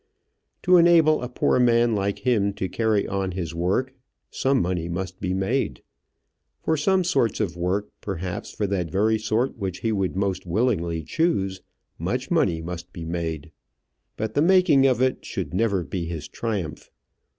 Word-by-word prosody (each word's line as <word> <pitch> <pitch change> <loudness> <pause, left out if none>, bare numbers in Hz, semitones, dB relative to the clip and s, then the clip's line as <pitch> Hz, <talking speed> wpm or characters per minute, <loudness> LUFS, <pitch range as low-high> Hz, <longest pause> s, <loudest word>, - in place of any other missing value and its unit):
To 180 0 +6
enable 165 -3 +5
a 125 - -4
poor 125 - +1
man 120 -1 +4
like 100 +2 -2
him 105 -5 +2
to 95 - -3
carry 105 +2 +1
on 95 -1 -2
his 85 -3 -4
work 95 +10 0 0.4
some 135 0 +1
money 85 -1 -1
must 90 +1 -4
be 90 -2 -1
made; 95 - -1 0.8
for 160 - +2
some 185 +5 +2
sorts 170 -10 +1
of 100 -6 -1
work, 90 +4 -1
perhaps 90 -1 -4
for 105 - -2
that 95 -4 -1
very 110 +6 +2
sort 110 +4 -1
which 95 -2 -4
he 115 - 0
would 95 -4 -1
most 95 -1 -1
willingly 85 -4 0
choose, 95 - 0 0.4
much - - -2
money 80 -1 +2
must 85 +1 -7
be 85 -2 -7
made. 80 -2 -4 0.7
But 110 0 -3
the 145 - +2
making 170 -6 +5
of 130 -1 +2
it 130 - 0
should 85 -5 -5
never 100 -2 +1
be 85 +3 -4
his 80 -3 -5
triumph. 100 -9 -4
100 Hz, 165 wpm, -24 LUFS, 90-125 Hz, 0.8 s, To